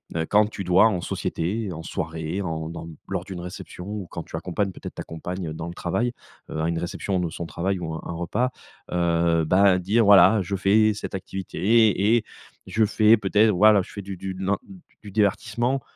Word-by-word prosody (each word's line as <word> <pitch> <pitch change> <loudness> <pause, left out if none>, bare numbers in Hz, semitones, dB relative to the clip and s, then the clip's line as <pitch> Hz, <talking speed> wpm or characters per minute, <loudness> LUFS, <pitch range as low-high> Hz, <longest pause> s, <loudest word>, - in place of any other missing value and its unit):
heu, 80 -1 0
quand 105 +4 +4
tu 100 -2 -6
dois 90 +4 +5
en 95 -5 -1
société, 95 +6 -3
en 80 0 -7
soirée, 80 +4 -4
en 80 -4 -3
dans 85 0 -7 0.2
lors - - -2
d'une 95 -2 -7
réception 90 0 -8
ou 105 -3 -5
quand 85 - -6
tu - - -9
accompagnes 95 +4 -2
peut-être - - -9
ta - - -5
compagne 85 +1 -5
dans 80 +1 -6
le 85 - -6
travail, 120 +8 -1 0.4
heu, 80 - -3
à 80 - +1
une 85 - -1
réception 90 +2 -2
de 90 -2 -1
son 85 +2 -6
travail 95 +4 -2
ou 80 -2 -4
un 80 - -5
un - - -5
repas, 95 +9 -1 0.4
heu, 85 -1 +2
bah 95 +3 +4
dire, 105 +6 +2
voilà, 100 +1 +7
je 100 +2 -3
fais 105 +3 +3
cette 105 - -6
activité 105 +3 +2
et 120 - +1 0.4
je 110 0 +2
fais 110 +2 +5
peut-être 105 +2 +3
voilà, 105 +1 +5
je - - -10
fais 100 - -6
du 100 0 -7
du 95 +1 -5
nan 95 +2 0
d 195 - -12 0.3
du 105 - -10
divertissement. 115 +5 0
95 Hz, 205 wpm, -24 LUFS, 85-105 Hz, 0.4 s, voilà